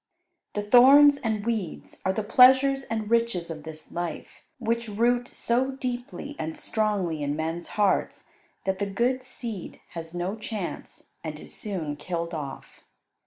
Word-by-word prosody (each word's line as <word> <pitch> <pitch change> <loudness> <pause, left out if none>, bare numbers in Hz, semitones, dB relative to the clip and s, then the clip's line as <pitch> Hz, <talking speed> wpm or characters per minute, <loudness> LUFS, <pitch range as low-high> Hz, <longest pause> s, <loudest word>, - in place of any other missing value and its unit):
The 205 - -2
thorns 275 +6 +8
and 220 -5 -2
weeds 220 -8 -3
are 190 - +2
the 215 +3 -2
pleasures 265 +4 +6
and 220 -2 -3
riches 230 -8 +1
of 155 -1 -6
this 155 0 -10
life, 175 -1 -5 0.2
which 235 -1 -1
root 240 +3 +1
so 260 +3 0
deeply 255 +2 -5
and 160 0 -4
strongly 200 -8 -1
in 145 0 -1
men's 165 +2 -3
hearts 205 -2 +1 0.4
that 190 0 0
the 200 - 0
good 240 +6 0
seed 235 -6 -5
has 165 0 -7
no 180 +4 -2
chance, 215 -4 -6
and 155 -2 -5
is - - -7
soon 165 -8 -4
killed 170 +2 -4
off. 145 -4 -7
210 Hz, 150 wpm, -26 LUFS, 170-245 Hz, 0.4 s, thorns